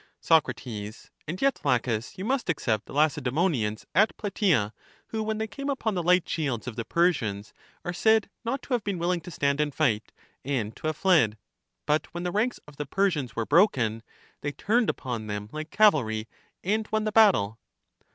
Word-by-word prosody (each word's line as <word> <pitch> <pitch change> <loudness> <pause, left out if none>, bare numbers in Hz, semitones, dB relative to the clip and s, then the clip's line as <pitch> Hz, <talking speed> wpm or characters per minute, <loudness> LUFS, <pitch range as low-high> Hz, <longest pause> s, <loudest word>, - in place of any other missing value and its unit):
Soc. 160 -2 +4 0.2
And 115 - -7
yet. 275 0 +2
Laches, 125 -4 0
you 185 - -4
must 255 -3 -1
except 115 -9 0
the - - -10
Lace 150 0 +3
daemonians 125 - 0
at 210 +6 +3
Plataea, 185 - +1 0.4
who, 220 - -2
when 215 0 -2
they 220 - -1
came 275 +6 -6
upon 230 -6 -1
the 180 - -1
light 180 +1 +3
shields 135 -7 -2
of 120 - -5
the 115 - -3
Persians, 115 - 0 0.3
are 175 - -2
said 220 +3 +3 0.2
not 260 +4 -2
to 265 - -4
have 240 -4 +1
been 200 -3 -2
willing 170 +1 0
to 175 - -9
stand 140 -3 0
and 150 -1 0
fight, 120 -9 +1 0.3
and 120 -6 -2
to - - -5
have 155 -1 -2
fled; 150 - +3 0.5
but 150 +1 +1
when 175 - -3
the 180 - -1
ranks 220 +6 0
of 150 -1 -14
the 145 - -4
Persians 160 - 0
were 115 - -1
broken, 130 - +3 0.4
they 145 - -2
turned 230 +7 +1
upon 115 -4 -3
them 105 0 -4
like 155 +1 -6
cavalry, 115 - +3 0.4
and 215 +3 0
won 215 0 +1
the 215 - -1
battle. 185 - +4
155 Hz, 190 wpm, -27 LUFS, -, 0.5 s, Soc